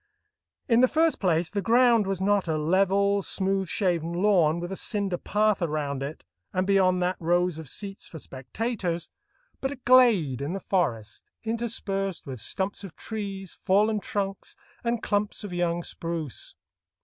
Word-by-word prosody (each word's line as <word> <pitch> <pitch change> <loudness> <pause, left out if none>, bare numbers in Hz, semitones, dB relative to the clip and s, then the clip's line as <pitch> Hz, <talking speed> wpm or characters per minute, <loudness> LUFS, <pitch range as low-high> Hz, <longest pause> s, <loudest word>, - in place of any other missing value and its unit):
In 235 -2 +4
the 255 - +6
first 320 +3 +2
place, 170 -3 +1
the 200 0 -1
ground 235 -1 +4
was 195 -2 -1
not 200 -1 +2
a 160 -1 0
level, 195 +5 +2
smooth 195 0 0
shaven 170 -4 0
lawn, 175 -4 +3
with 175 +2 -5
a - - -3
cinder 200 -3 -1
path 210 -1 +1
around 150 -4 -2
it, 140 +3 -6 0.3
and 185 +1 0
beyond 185 -2 +3
that 180 +1 0
rows 175 0 +1
of 155 -4 -8
seats 200 +4 -6
for 165 - -9
spectators, 170 - -4 0.5
but 270 - -1
a 285 - -5
glade 235 - +4
in 145 +5 -2
the 195 - -3
forest, 125 - -2
interspersed 210 -5 -2
with 130 -3 -6
stumps 190 - -2
of 190 -5 -9
trees, 195 -4 -5
fallen 210 +3 +2
trunks, 195 -1 -4 0.3
and 235 -1 -1
clumps 205 +1 -1
of 200 -3 -6
young 175 -1 0
spruce. 165 -8 -5
190 Hz, 160 wpm, -26 LUFS, 170-205 Hz, 0.5 s, the